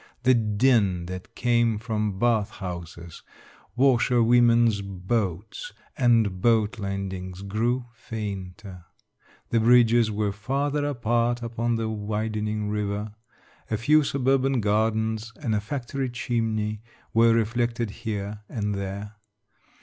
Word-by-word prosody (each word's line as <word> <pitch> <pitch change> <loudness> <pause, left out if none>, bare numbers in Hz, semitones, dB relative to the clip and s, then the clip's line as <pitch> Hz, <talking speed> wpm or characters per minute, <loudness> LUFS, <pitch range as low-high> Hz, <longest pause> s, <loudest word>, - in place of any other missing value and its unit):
The 130 +1 +5
din 105 -5 +2
that 90 +1 -8
came 120 -2 +2
from 105 -3 -2
bath 115 -2 +2
houses, 85 -3 -8 0.5
washerwomen's 120 -3 +4
boats, 100 - -3 0.2
and 115 -8 +2
boat 115 +1 +2
landings, 95 -2 -4
grew 120 +5 -1
fainter; 100 -5 -7 0.7
the 115 - +3
bridges 120 0 +5
were 105 -1 -1
farther 140 +7 -1
apart 120 -2 0
upon 115 0 -1
the 115 -1 -1
widening 105 0 -2
river. 105 0 -2 0.6
A 110 - 0
few 150 +8 +4
suburban 135 -1 +1
gardens 110 +1 0
and 120 -8 -1
a 105 - +1
factory 130 +2 -3
chimney 110 -3 -2 0.3
were 115 0 +5
reflected 115 0 0
here 105 -2 -5
and 105 -3 -2
there. 100 +2 -5
110 Hz, 110 wpm, -25 LUFS, 105-120 Hz, 0.7 s, The